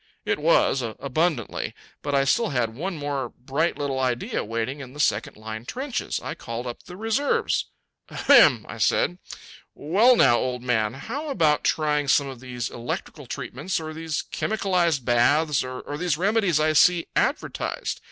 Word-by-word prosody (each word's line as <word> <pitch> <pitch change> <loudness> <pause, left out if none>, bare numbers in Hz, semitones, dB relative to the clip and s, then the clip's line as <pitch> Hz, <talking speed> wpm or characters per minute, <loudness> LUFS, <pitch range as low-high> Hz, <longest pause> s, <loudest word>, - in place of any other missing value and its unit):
It - - 0
was 150 -3 +3
abundantly. 135 +3 -2 0.3
But 145 -1 -1
I 135 - +4
still 225 +11 +2
had 120 -4 -1
one 170 +8 -4
more 140 -4 -3
bright 140 +8 -2
little 140 -2 -2
idea 125 -2 -1
waiting 115 +5 -3
in 130 -2 -9
the 150 - -11
second 110 -8 0
line 110 +1 -7
trenches. 260 - -3
I - - -4
called 115 +1 -6
up 120 -1 -6
the 180 0 -11
reserves. 225 +7 0 0.4
"Ahem!" - - +5
I - - -8
said. 180 - +2 0.6
"Well 210 - +4
now, 120 - +5
old 125 -1 -3
man, 115 -2 0
how 275 - -5
about 155 - +2
trying 150 -2 +1
some 140 +1 +4
of 135 -3 -8
these 125 -2 -5
electrical 120 0 -6
treatments 155 +10 -4
or 155 0 -6
these 160 0 -3
chemicalized 180 - 0
baths 140 +5 +3
or 130 0 -6 0.2
these 175 -4 0
remedies 195 -3 +2
I 155 0 +2
see 170 +3 +5
advertised? - - -1
145 Hz, 160 wpm, -24 LUFS, 125-175 Hz, 0.6 s, Ahem